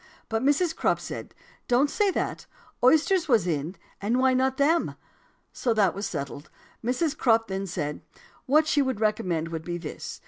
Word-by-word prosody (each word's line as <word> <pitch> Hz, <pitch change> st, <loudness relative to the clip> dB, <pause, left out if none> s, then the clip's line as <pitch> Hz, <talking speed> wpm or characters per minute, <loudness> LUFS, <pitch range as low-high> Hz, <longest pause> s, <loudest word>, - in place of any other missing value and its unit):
But 225 Hz, 0 st, 0 dB
Mrs. 305 Hz, +5 st, +2 dB
Crupp -, -, +1 dB
said, -, -, -7 dB, 0.3 s
'Don't 250 Hz, +4 st, +4 dB
say 415 Hz, -2 st, +2 dB
that; -, -, -3 dB, 0.4 s
oysters 320 Hz, +6 st, +4 dB
was 230 Hz, -, +3 dB
in, 160 Hz, +1 st, -2 dB, 0.3 s
and 220 Hz, +5 st, +1 dB
why 260 Hz, 0 st, +4 dB
not 260 Hz, +1 st, +1 dB
them?' 320 Hz, +4 st, +2 dB, 0.6 s
So 240 Hz, -4 st, 0 dB
that 200 Hz, -4 st, +3 dB
was 200 Hz, +1 st, -3 dB
settled. 140 Hz, -1 st, -6 dB, 0.3 s
Mrs. 280 Hz, +6 st, 0 dB
Crupp 225 Hz, -5 st, +3 dB
then 195 Hz, +1 st, -3 dB
said 150 Hz, -4 st, -4 dB, 0.5 s
'What 305 Hz, +4 st, +4 dB
she 295 Hz, -2 st, +2 dB
would 260 Hz, -5 st, -1 dB
recommend 180 Hz, -7 st, 0 dB
would 165 Hz, -1 st, -5 dB
be 175 Hz, +1 st, -4 dB
this. 165 Hz, -3 st, -7 dB
230 Hz, 170 wpm, -26 LUFS, 180-285 Hz, 0.6 s, Don't